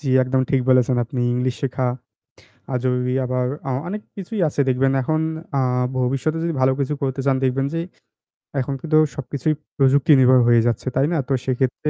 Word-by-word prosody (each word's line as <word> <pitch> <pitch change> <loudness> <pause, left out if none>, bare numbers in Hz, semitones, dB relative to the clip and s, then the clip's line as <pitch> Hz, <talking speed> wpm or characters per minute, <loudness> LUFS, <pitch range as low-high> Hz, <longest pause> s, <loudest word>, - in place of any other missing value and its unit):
জি, 140 - -5
একদমই 130 +1 +1
ঠিক 135 - +3
বলেছেন 130 0 +3
আপনি 125 +1 -5
ইংলিশ 125 +1 -1
শেখা, 130 -1 -1 0.9
আজ 125 -1 -1
ওই 125 0 -1
আবার 125 0 -1 0.2
অ - - -1 0.2
অনেক 210 +3 -5
কিছুই 200 +2 -5
আছে 145 - -3
দেখবেন। 135 +1 +2
এখন 155 +4 0 0.4
আ - - +3 0.4
ভবিষ্যতে 135 +5 0
যদি 170 0 -1
ভালো 130 0 +4
কিছু 140 +2 -1
করতে 135 0 -1
চান 135 - +3
দেখবেন 135 +1 +1
যে 165 - -1 0.8
এখন 135 +2 -2
কিন্তু 155 -1 +1 0.2
সবকিছুই 140 +1 -2 0.2
প্রযুক্তি 140 +1 +3
নির্ভর 130 0 +6
হয়ে 120 -1 +5
যাচ্ছে। 120 +2 -2
তাই 135 +2 +3
না? - - +1
তো 140 - 0
সেক্ষেত্রে 130 +3 -1
130 Hz, 180 wpm, -21 LUFS, 125-140 Hz, 0.9 s, নির্ভর